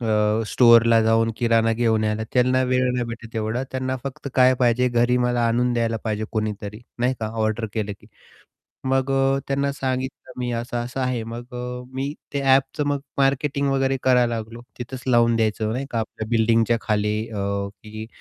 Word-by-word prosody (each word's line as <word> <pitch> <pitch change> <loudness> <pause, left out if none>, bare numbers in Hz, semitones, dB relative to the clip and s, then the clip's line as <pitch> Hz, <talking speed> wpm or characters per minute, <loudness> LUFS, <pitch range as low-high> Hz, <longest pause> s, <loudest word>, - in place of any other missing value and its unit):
अ, 110 -1 +1
स्टोअरला 115 -1 +6
जाऊन 115 +1 +3
किराणा 115 -1 +2
घेऊन 110 -1 +1
यायला. 105 +1 -1
त्यांना 130 +1 +3
वेळ 130 0 +1
नाही 125 -1 -1
भेटत 115 0 -8
एवढा 110 +3 -1
त्यांना 130 0 -2
फक्त 135 0 -6
काय 130 0 +5
पाहिजे, 125 0 +2
घरी 120 +1 +2
मला 125 0 +1
आणून 120 +1 +1
द्यायला 115 -1 0
पाहिजे 110 -1 -1
कोणीतरी, 105 0 -3 0.2
नाही 125 +2 +1
का. 110 - -1 0.2
ऑर्डर 110 +1 0
केलं 105 -2 -2
की. - - -18 0.8
मग 135 +1 +1
अ, 135 0 +2
त्यांना 140 0 0
सांगितलं 130 -1 -4
मी 125 0 -2
असं-असं 120 +2 -4
आहे, 125 -3 -1
मग 120 +2 -8
अ, 125 0 -5
मी 135 +2 -2 0.2
ते 140 - -1
ॲपचं 135 +2 +2
मग 145 -1 0 0.2
मार्केटिंग 140 +1 +1
वगैरे 135 0 +1
करायला 125 -2 +3
लागलो, 115 +1 -6 0.2
तिथंच 125 +1 -7
लावून 120 -2 +4
द्यायचं 110 -1 0
नाही 135 +3 -3
का 115 - -1
आपल्या 110 0 -5
बिल्डिंगच्या 115 0 +3
खाली 105 0 0
अ, 105 -2 -3 0.4
की 110 0 -8
120 Hz, 175 wpm, -23 LUFS, 115-130 Hz, 0.8 s, स्टोअरला